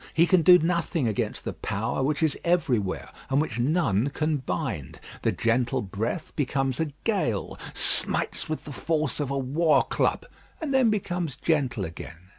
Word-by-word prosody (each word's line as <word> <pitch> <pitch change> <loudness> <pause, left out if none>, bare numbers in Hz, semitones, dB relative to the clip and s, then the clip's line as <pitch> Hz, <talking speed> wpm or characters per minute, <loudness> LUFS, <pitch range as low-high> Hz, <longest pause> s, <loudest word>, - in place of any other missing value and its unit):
He 165 +2 +5
can 180 0 +4
do 180 +3 +8
nothing 170 -4 0
against 110 - -2
the - - -3
power 110 +5 -3
which 150 +4 0
is 155 -3 +2
everywhere, 130 - 0 0.2
and 135 +1 +2
which 135 -7 -2
none 130 - +1
can 155 +1 -1
bind. 130 - -4 0.2
The - - +1
gentle 115 +1 0
breath 110 - -4
becomes 135 -2 -1
a 160 -2 -1
gale, 180 - -1 0.2
smites - - +3
with 155 - -3
the 145 - -7
force 155 0 -1
of 145 -3 -2
a 140 - -1
war 145 +3 +2
club, - - 0 0.3
and 305 -4 -3
then 260 -3 +4
becomes 175 -8 -2
gentle 130 - 0
again. 85 +2 -10
145 Hz, 165 wpm, -26 LUFS, 120-165 Hz, 0.3 s, do